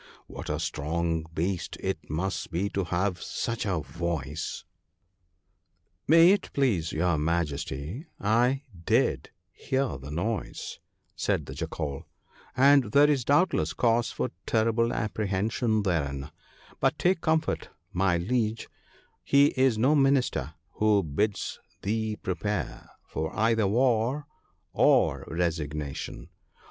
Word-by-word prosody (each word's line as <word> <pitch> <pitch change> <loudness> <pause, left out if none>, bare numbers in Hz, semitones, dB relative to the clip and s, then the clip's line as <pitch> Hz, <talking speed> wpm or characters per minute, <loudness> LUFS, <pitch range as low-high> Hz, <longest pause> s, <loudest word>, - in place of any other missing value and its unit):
What - - -8
a - - -1
strong 80 +1 -2
beast 90 +2 -2
it - - -4
must 90 +5 -2
be 90 +5 -1
to 100 -2 -2
have 90 +1 -1
such 115 -2 -3
a 90 -5 0
voice! 80 -3 -4 0.5
' 90 0 -47
' 90 +1 -47
May 165 +3 +8
it 200 - +1
please 105 - +1
your 85 -1 +1
Majesty, 80 - -2
I 120 +6 +2 0.2
did - - +1 0.2
hear 130 - -2
the 70 +2 -9
noise,' 95 +6 -3 0.4
said - - 0
the - - -7
Jackal, 70 -3 -4 0.2
* - - -27
and 140 0 +6
there 145 +1 +7
is 135 -4 +1
doubtless 170 +8 +2
cause 115 -1 +2
for - - -2 0.2
terrible 115 +1 +2
apprehension 110 0 0
therein; 70 -7 -1 0.5
but - - +2
take 180 -1 +2
comfort, 160 0 0 0.2
my 90 -1 +2
liege, 110 +4 -1 0.5
he 140 +1 +5
is 130 -4 +2
no 130 +7 +4
minister 135 - +2 0.2
who 105 -2 +4
bids 95 +7 -1 0.2
thee 110 +1 -1
prepare 95 - -3 0.2
for 80 0 -3
either 110 -1 +3
war 125 +5 +2 0.5
or - - +3
resignation. 75 -4 -3
100 Hz, 125 wpm, -28 LUFS, 85-120 Hz, 0.5 s, May